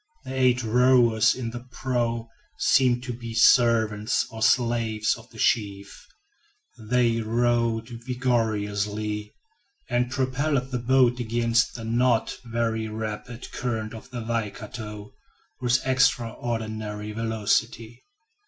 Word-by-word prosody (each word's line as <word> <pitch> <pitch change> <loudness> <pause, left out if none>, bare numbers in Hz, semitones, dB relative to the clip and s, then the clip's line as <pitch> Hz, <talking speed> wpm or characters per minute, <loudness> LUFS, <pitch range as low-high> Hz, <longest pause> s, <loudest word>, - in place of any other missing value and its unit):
The 130 - -6
eight 125 -2 +2
rowers 120 -1 +4
in 120 -3 -4
the 120 - -6
prow 120 -2 -2 0.3
seemed 125 -2 +3
to 125 -1 -4
be 115 -1 -7
servants 110 -3 +4
or 110 0 -8
slaves 115 -3 +2
of 120 +1 -14
the 115 - -16
chief. 100 -3 -1 0.8
They 120 -2 +2
rowed 115 0 +1
vigorously, 110 -4 -2 0.6
and 120 0 +1
propelled 135 +1 -1
the 125 - -1
boat 125 0 +3
against 115 0 +1
the 115 - -7
not 120 0 +1
very 115 -1 -1
rapid 110 +2 -6
current 115 -3 -3
of 115 +3 -10
the 120 -3 -6
Waikato, 110 -1 -5 0.5
with 120 0 +1
extraordinary 115 -4 -1
velocity. 110 +1 -1
115 Hz, 110 wpm, -25 LUFS, 110-125 Hz, 0.8 s, rowers